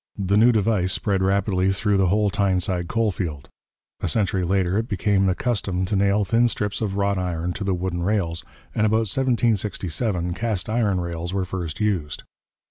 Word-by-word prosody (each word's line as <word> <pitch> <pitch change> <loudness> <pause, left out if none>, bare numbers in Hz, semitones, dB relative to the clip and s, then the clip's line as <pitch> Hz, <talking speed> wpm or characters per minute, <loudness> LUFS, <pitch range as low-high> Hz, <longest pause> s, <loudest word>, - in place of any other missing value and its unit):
The 100 0 0
new 115 +4 +6
device 105 -4 +1
spread 100 -2 0
rapidly 95 0 +1
through 100 +1 +1
the 95 -1 +3
whole 105 +2 +2
Tyneside 90 -2 0
coal 115 +2 +1
field. 80 -7 -5 0.5
A - - -2
century 100 -4 0
later 95 +2 +1
it 115 - -3
became 100 -2 +1
the 90 - +1
custom 100 -7 -1
to 95 - -2
nail 100 +1 +2
thin 115 +5 +3
strips 105 -2 -2
of 100 -3 -2
wrought 100 -1 +1
iron 90 -1 -2
to 105 - -5
the 95 -2 0
wooden 90 -1 -3
rails, 85 -4 -1 0.3
and 110 - +2
about 110 +1 +2
1767 105 -7 0
cast 105 0 -2
iron 105 -5 +1
rails 85 +1 -4
were 95 -1 0
first 90 -3 -5
used. 95 -9 -1
95 Hz, 180 wpm, -23 LUFS, 90-105 Hz, 0.5 s, new